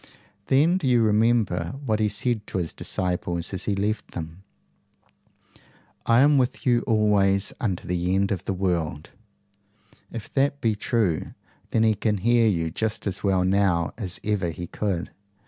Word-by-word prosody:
Then 155 +7 +3
do 150 - -2
you 120 -2 +4
remember 110 -3 +1
what 110 -3 0
he 105 -1 +2
said 110 0 -1
to - - -4
his 85 -3 -2
disciples 90 -1 -2
as 95 - -3
he 100 - 0
left 105 +2 -2
them: 80 +2 -7 1.7
'I 115 +2 +5
AM 145 +1 +5
WITH 125 -1 -1
YOU 120 -2 +3
ALWAYS 100 -3 +2
UNTO 95 -7 -2
THE 90 +1 0
END 100 +1 +1
OF 95 -4 -3
THE - - -1
WORLD'? 85 -5 -2 1.0
If 115 -3 -8
that 140 +1 +1
be 115 -4 +1
true, 105 -5 -1 0.3
then 110 - +2
he 110 -1 +4
can 105 0 0
hear 115 +3 +3
you 85 -5 0
just 110 +4 -3
as 100 - -3
well 95 -2 +2
now 95 -3 +1
as 95 -6 -3
ever 100 -5 0
he 85 +2 -6
could. 90 -1 -3
105 Hz, 165 wpm, -24 LUFS, 90-115 Hz, 1.7 s, I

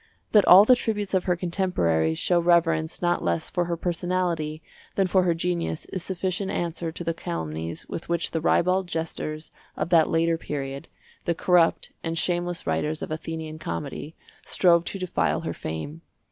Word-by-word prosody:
That 210 -2 +5
all 190 +3 +10
the 255 - +7
tributes 210 -5 -2
of 185 -1 +2
her 180 - +2
contemporaries 165 - 0
show 175 -1 +2
reverence 165 -1 +2
not 175 0 +1
less 85 -1 -1
for 175 - 0
her 170 0 -2
personality 170 -3 -1 0.3
than 195 - +3
for 185 +1 +3
her 175 -2 +2
genius 170 -2 -2
is 185 - -2
sufficient 190 +2 -2
answer 170 -2 -2
to 170 - -7
the 165 - -1
calumnies 80 - -5
with 165 - -6
which 170 -1 0
the 160 - -1
ribald 185 +3 +2
jesters 160 -2 -4 0.3
of - - -2
that 165 -3 +5
later 165 0 +2
period, 140 -3 -5 0.4
the 170 - +1
corrupt 175 -1 +2
and 165 0 -2
shameless 175 0 -1
writers 150 - -1
of - - -6
Athenian 160 0 -5
comedy, 115 - -5 0.3
strove 170 -2 +3
to 195 - -4
defile 185 -2 0
her - - -3
fame. 110 - -6
170 Hz, 170 wpm, -25 LUFS, 155-180 Hz, 0.4 s, all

